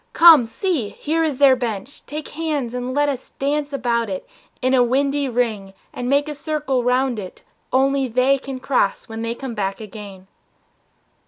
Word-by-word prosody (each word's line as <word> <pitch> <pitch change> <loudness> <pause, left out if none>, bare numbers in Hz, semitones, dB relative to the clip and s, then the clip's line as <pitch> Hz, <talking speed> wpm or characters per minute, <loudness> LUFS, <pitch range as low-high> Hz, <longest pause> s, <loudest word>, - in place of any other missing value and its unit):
Come, 320 -8 +8
see, 280 - -1
Here 325 +8 -1
is 300 -5 -1
their 275 -2 +6
bench, 240 +1 -5
take 305 +1 -6
hands 295 -6 -2
and 250 0 -3
let 290 0 +3
us 270 -3 -3
dance 285 +1 -1
About 235 -4 0
it 190 -1 -5 0.3
in 255 +1 +1
a 255 - +5
windy 275 +3 +1
ring 220 -5 -1 0.2
and 245 0 -3
make 285 +2 +2
A 300 - -3
circle 290 -4 -1
round 250 -1 +1
it 185 -3 -9 0.3
only 270 +1 +2
they 255 +3 +2
can 270 -1 -6
cross 255 -7 0
When 225 0 -6
they 230 +1 -2
come 265 -1 -6
back 195 -3 -2
again!" 205 -3 -10
255 Hz, 175 wpm, -21 LUFS, 230-285 Hz, 0.3 s, Come